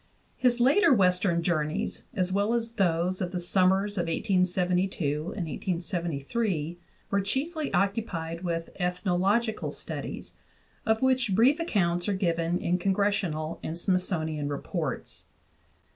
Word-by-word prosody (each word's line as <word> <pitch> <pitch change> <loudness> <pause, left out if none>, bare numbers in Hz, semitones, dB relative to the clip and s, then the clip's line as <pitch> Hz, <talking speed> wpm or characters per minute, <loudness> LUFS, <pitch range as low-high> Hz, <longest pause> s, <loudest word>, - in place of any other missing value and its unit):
His 245 -1 +2
later 290 - +5
western 180 -5 +3
journeys, 155 -3 -1
as 185 -1 0
well 205 +4 +2
as 230 -1 -1
those 185 -3 +1
of 180 - -1
the 180 - -2
summers 190 +3 +2
of 175 - -1
1872 180 +1 +1 0.4
and 180 - -2
1873, 170 - -2 0.3
were 200 - +2
chiefly 295 - -2
occupied 180 -4 -1
with 165 -1 -2
ethnological 185 +5 0
studies, - - -6 0.5
of 220 +3 +2
which 255 -6 +2
brief 260 - +5
accounts 175 - 0
are - - +2
given 170 -2 0
in 180 0 0
Congressional 190 -5 0
and 160 - -4
Smith 185 +1 +2
sonian 155 -5 -2
reports. 145 0 -4
185 Hz, 125 wpm, -28 LUFS, 170-205 Hz, 0.5 s, later